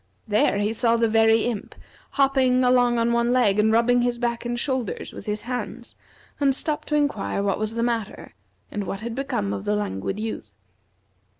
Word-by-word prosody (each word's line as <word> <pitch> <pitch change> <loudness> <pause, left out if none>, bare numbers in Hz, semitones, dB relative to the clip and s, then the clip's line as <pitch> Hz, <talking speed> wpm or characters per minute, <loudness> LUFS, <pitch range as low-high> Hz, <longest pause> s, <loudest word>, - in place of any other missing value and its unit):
There 210 -1 +2
he 205 +2 0
saw 230 0 +2
the 230 0 +2
Very 225 0 +4
Imp 235 -4 -4 0.4
hopping 265 -2 +3
along 245 -1 +3
on 235 0 +2
one 235 0 +2
leg, 215 -5 +3
and 220 +1 +4
rubbing 240 +2 +3
his 245 0 0
back 235 0 -2
and 240 0 -2
shoulders 260 -5 -3
with - - -10
his 210 0 -2
hands, 250 0 -3 0.5
and 275 -2 +3
stopped 300 +1 -3
to 300 - 0
inquire 280 -9 0
what 195 -1 0
was 215 +1 -2
the 230 - 0
matter, 230 -3 -3 0.4
and 205 -1 -3
what 195 +1 -5
had 235 +1 -4
become 245 -6 -2
of 190 - -4
the 210 0 0
Languid 195 - -3
Youth. 215 - -5
235 Hz, 190 wpm, -24 LUFS, 210-245 Hz, 0.5 s, Very